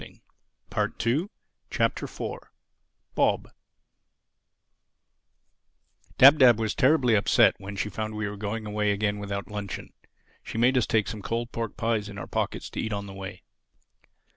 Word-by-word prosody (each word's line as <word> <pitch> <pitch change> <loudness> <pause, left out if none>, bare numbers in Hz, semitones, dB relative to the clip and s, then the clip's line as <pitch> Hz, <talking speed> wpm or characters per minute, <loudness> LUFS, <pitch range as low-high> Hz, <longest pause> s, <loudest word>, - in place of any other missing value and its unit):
THE - - -12 0.5
FOURTH 140 - 0 0.4
CHAPTER - - -1 1.0
BOB - - +1 2.7
DAB 140 +4 +9
DAB 120 -4 +7
was 110 -1 -1
terribly 130 -3 +3
upset 100 -2 +5
when 100 +1 -7
she 100 - -2
found 110 +1 -4
we 105 -1 -2
were 105 - -5
going 105 +2 -4
away 105 0 0
again 105 0 -1
without 100 0 -5
luncheon; 105 -2 -6
and - - -33 0.3
she - - -7
made 125 +3 +4
us 125 - +2
take 110 -2 +1
some 105 - -5
cold 115 +3 -3
pork 115 -2 -4
pies 110 -3 -1
in 100 - -9
our - - -5
pockets - - -3
to - - -3
eat 110 - -3
on 100 0 -3
the 100 - -9
way. 95 0 -8
105 Hz, 150 wpm, -26 LUFS, 100-115 Hz, 2.7 s, DAB